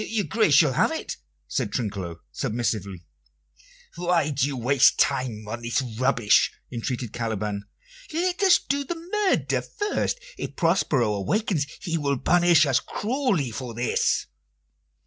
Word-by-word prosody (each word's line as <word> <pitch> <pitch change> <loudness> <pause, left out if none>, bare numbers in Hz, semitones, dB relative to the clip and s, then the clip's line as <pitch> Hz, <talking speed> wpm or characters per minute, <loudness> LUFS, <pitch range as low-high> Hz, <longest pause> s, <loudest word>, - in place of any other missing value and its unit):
"Your 220 -3 0
grace 215 -10 +3
shall 145 -3 +5
have - - +2
it," - - -4 0.3
said 105 - -2
Trinculo 95 -8 -4
submissively. 110 -7 -3 0.9
"Why 170 -3 +1
do 140 -1 +1
you 140 -2 -4
waste 130 +2 +4
time 110 -5 0
on 120 +2 -5
this 120 0 0
rubbish?" 120 -2 +2 0.2
entreated 120 -1 -4
Caliban. 105 -3 -3 0.5
"Let 360 +4 -1
us 380 -3 +6
do 280 +1 -2
the 345 +5 -4
murder 380 +4 0
first. 415 +3 -2 0.2
If - - -5
Prospero 150 - +2
awakens 150 - 0
he 165 -3 -2
will 140 -2 0
punish 175 0 +4
us 135 -3 +3
cruelly 210 - -1
for 120 0 -6
this." 120 +1 +1
135 Hz, 135 wpm, -25 LUFS, 115-190 Hz, 0.9 s, us